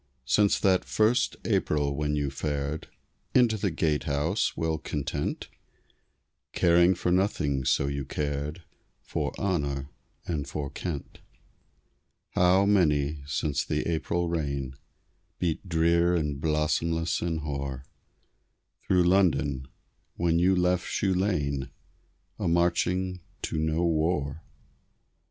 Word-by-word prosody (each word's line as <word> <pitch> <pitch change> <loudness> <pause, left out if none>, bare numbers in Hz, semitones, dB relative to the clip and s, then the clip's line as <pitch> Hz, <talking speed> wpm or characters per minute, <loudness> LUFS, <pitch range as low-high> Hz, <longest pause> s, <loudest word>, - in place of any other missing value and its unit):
Since 100 +10 +3
that 95 -2 +3
first 115 +4 +2
April 70 -2 +1
when 75 +1 -1
you 70 -2 -1
fared 75 +1 -3 0.5
Into 120 -3 +5
the 100 -2 0
Gatehouse, 75 +2 0
well 80 -1 -1
content, 75 -2 -3 1.1
Caring 85 +1 +4
for 90 - -1
nothing 75 -8 +1
so 70 - +2
you 70 0 -2
cared 75 +4 -3 0.4
For - - -2
honor 70 -7 -1 0.3
and 75 -5 -3
for 70 -3 -4
Kent. 80 -6 -5 1.1
How 90 +2 +4
many, 75 -7 +2
since 75 -1 -1
the 75 - -2
April 85 +1 -1
rain 70 -5 -2 0.6
Beat 90 +2 -2
drear 85 +1 +3
and 75 -4 -1
blossomless 80 +2 0
and 80 -2 -1
hoar 70 -3 -4 1.0
Through 90 -1 +4
London, 85 -8 +2 0.5
when 85 -1 +2
you 95 +2 +4
left 90 0 +1
Shoe 95 -2 0
Lane, 75 -8 0 0.7
A - - -1
marching 90 +2 +1 0.2
to 80 - -2
no 80 +2 +1
war! 80 -2 0
80 Hz, 110 wpm, -27 LUFS, 70-90 Hz, 1.1 s, Into